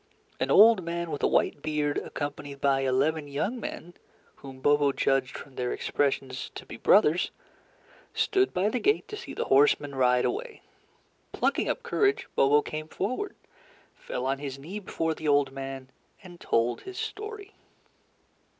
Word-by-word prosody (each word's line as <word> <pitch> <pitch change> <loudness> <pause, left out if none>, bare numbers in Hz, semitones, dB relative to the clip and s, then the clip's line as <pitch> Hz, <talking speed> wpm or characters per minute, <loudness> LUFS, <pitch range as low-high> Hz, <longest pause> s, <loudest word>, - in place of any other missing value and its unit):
An - - -1
old 215 -2 +7
man 170 0 -3
with 145 - -4
a - - +3
white 145 - +1
beard, 150 -1 0
accompanied 145 -1 -6
by 140 -1 +2
eleven 140 +4 +1
young 185 - -2
men, 175 -5 -7 0.4
whom 135 -2 -11
Bobo 145 +1 +3
judged, 135 -2 0
from 140 - -11
their 125 -1 -2
expressions, 135 -2 -1
to - - -8
be - - -9
brothers, 175 - +4 0.9
stood 385 0 +2
by 185 +3 +1
the 250 - -1
gate 420 - +1
to 425 - -5
see 420 - -8
the - - -2
horseman 145 +1 +3
ride 125 -2 +3
away. 450 +3 -4 0.7
Plucking - - 0
up - - -2
courage, 410 +2 +1
Bobo 145 +2 +4
came 155 0 -5
forward, 255 - -3 0.6
fell 125 - -5
on 135 +1 0
his 140 -2 -5
knee 170 +10 -7
before 165 -4 -2
the 155 0 -6
old 145 -2 +3
man, 135 -1 -7 0.3
and 175 -2 -12
told 115 +1 +1
his 380 -1 -9
story. 420 -1 -6
145 Hz, 160 wpm, -27 LUFS, 135-195 Hz, 0.9 s, old